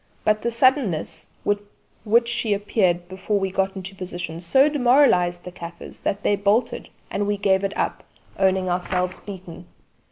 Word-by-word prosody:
But 215 0 +2
the 235 - 0
suddenness 230 - +1 0.2
with 205 0 +1 0.4
which 235 +2 +4
she 230 -3 0
appeared 185 -4 0
before 190 +3 -2
we 195 -1 -1
got 195 +1 0
into 190 0 -6
position 175 -3 -5
so 265 - +4
demoralised 245 -11 +3
the 180 - -8
kaffirs 170 -1 -9
that 200 +1 -2
they 205 - +3
bolted, 210 +4 0 0.2
and 205 0 -1
we 205 0 0
gave 195 -1 +2
it 195 - -2
up, - - -2 0.4
owning 190 -1 +2
ourselves 180 +1 -1
beaten. 180 -3 -10
195 Hz, 160 wpm, -23 LUFS, 180-215 Hz, 0.4 s, which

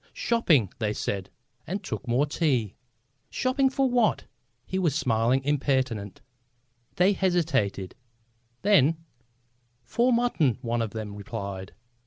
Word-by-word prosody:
"Shopping," 160 - +2
they 105 -2 0
said, 100 -2 -3 0.4
and 190 +4 -3
took - - -5
more 125 +5 +2
tea. 130 - 0 0.6
"Shopping, 265 +1 +1
for 270 0 +1
what?" 245 -3 +2 0.4
He 190 - -2
was 165 -7 +1
smilingly 125 -1 +1
impertinent. 130 -8 0 0.7
They 185 +3 +4
hesitated. 155 - 0 0.7
Then: 165 -6 +4 0.9
"For 240 - +1
mutton," 235 - +2
one 120 0 -1
of 115 - -1
them 110 -1 -6
replied. 100 -2 -6
135 Hz, 115 wpm, -26 LUFS, -, 0.9 s, They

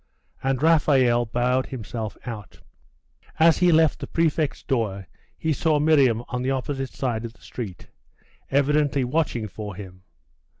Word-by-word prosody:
And 135 +1 -1
Raphael 135 -7 +4
bowed 125 +3 0
himself 110 -3 -6
out. 110 -5 -8 0.8
As 165 0 +5
he 180 -1 +4
left 160 -1 +4
the - - -6
prefect's 155 -4 0
door, 105 -8 -2 0.3
he 160 -1 0
saw 155 +1 +1
Miriam 140 -7 +3
on 125 - -3
the 130 - -1
opposite 135 0 -2
side 120 -4 -3
of 115 -1 -6
the - - -26
street, 105 -8 -7 0.6
evidently 145 0 +2
watching 125 -4 -1
for 105 0 -7
him. 90 -2 -10
130 Hz, 140 wpm, -24 LUFS, 115-150 Hz, 0.8 s, As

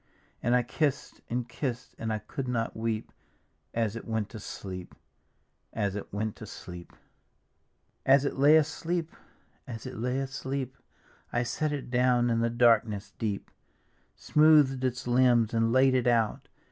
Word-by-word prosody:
And 120 +1 +2
I 125 - +3
kiss'd 140 0 -2
and 120 0 -2
kiss'd 125 -1 -4
and 110 -1 -2
I 110 - 0
could 115 +5 -6
not 115 -2 -1
weep. 110 -1 -2 0.6
As 115 -2 -1
it 115 - -7
went 110 -2 -1
to 110 - -8
sleep, 95 -3 -7 0.8
as 100 -3 -1
it 105 - -6
went 105 +1 -2
to - - -9
sleep, 90 0 -10
6 - - -32 1.1
As 135 +1 +6
it - - -1
lay 145 +3 +7
asleep, 165 +2 -1 0.5
as 115 -1 -7
it 130 - -6
lay 125 +3 -1
asleep, 135 -1 -3 0.6
I 120 - +1
set 155 +5 -1
it 140 -4 -5
down 125 -1 +3
in 115 - +1
the 115 0 +2
darkness 115 -3 +2
deep, 105 -4 -3 0.6
Smooth'd 150 -4 +4
its 125 -1 -1
limbs 120 -2 +3
and 115 0 +2
laid 130 +1 +5
it 125 -1 +2
out. 115 -3 +1
120 Hz, 160 wpm, -29 LUFS, 115-130 Hz, 1.1 s, lay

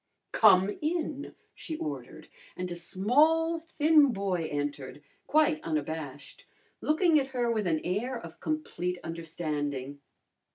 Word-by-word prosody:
"Come 200 -2 +5
in!" 305 -3 -2 0.2
she 315 - -6
ordered, 150 - -6 0.3
and 180 0 -4
a - - -3
small 300 - +2
thin 310 -3 +4
boy 190 -6 -1
entered, 145 -1 -4 0.2
quite 300 - +3
unabashed, 150 -2 -5 0.3
looking 310 0 +4
at 270 - -2
her 240 -1 +2
with 215 -4 0
an 160 -2 +1
air 230 +8 -2
of 165 -6 -11
complete 180 - -2
understanding. 150 -4 -4
185 Hz, 120 wpm, -29 LUFS, -, 0.3 s, Come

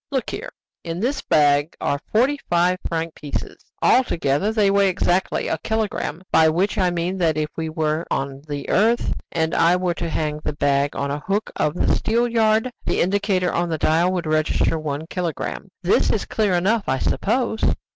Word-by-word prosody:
Look 265 -5 -2
here! - - -5 0.3
In 165 +1 -4
this 265 +6 -1
bag 145 +1 +2
are 140 - -1
forty 265 +6 +2
five 175 +1 +2
franc 165 0 -3
pieces 145 - -6 0.2
altogether 175 - +2
they 210 -3 +3
weigh 200 -1 +4
exactly 180 0 0
a 160 - -1
kilogramme; 210 -5 -2
by 160 0 +5
which 185 +7 0
I 185 -1 +3
mean 175 +2 -2
that 160 -3 +2
if 150 0 -1
we 160 -1 -3
were 155 +1 -1
on 135 0 -3
the 145 -1 -5
earth, 230 +4 +2 0.2
and 160 -1 0
I 170 +2 +4
were 180 -1 0
to 170 0 -4
hang 150 -1 -2
the 150 - -3
bag 140 -1 +1
on 140 0 -2
the 145 - -2
hook 195 +7 -2
of 150 - 0
the - - +1
steelyard, 225 0 +2
the - - -1
indicator 190 -1 +1
on 175 0 0
the 160 - -1
dial 165 +4 +2
would 180 -2 -2
register 155 +1 +1
one 150 0 -4
kilogramme. 175 -1 -4
This - - +3
is - - 0
clear 210 -4 0
enough, 200 +5 +1
I 130 - +1
suppose?" 225 - -1
175 Hz, 185 wpm, -22 LUFS, 155-205 Hz, 0.3 s, by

